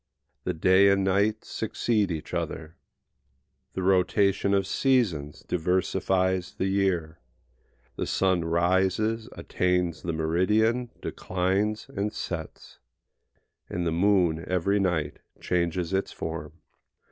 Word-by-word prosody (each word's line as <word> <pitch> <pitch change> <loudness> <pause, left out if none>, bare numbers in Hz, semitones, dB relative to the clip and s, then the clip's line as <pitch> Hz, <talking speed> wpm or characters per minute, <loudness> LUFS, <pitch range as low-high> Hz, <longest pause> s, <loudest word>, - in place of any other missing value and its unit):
The 90 - -1
day 95 +4 +5
and 100 0 +3
night 100 +3 +1
succeed 110 -1 -1
each 80 -3 -5
other, 80 +1 -4 1.0
the 95 - -3
rotation 95 +2 +2
of 100 -1 +1
seasons 95 - 0
diversifies 95 +1 0
the - - -1
year, 95 -5 0 0.8
the - - -2
sun 95 -3 +1
rises, 95 +6 +1
attains 90 -3 -1
the 85 - -2
meridian, 105 +10 +1
declines, 95 +4 -1
and 100 +1 -1
sets; 85 -6 -7 0.9
and 90 0 -2
the 85 - +1
moon 85 -2 +2
every 95 +3 +1
night 80 -6 -1 0.2
changes 85 0 -1
its 95 0 0
form. 80 -2 -6
95 Hz, 110 wpm, -27 LUFS, 85-100 Hz, 1.0 s, day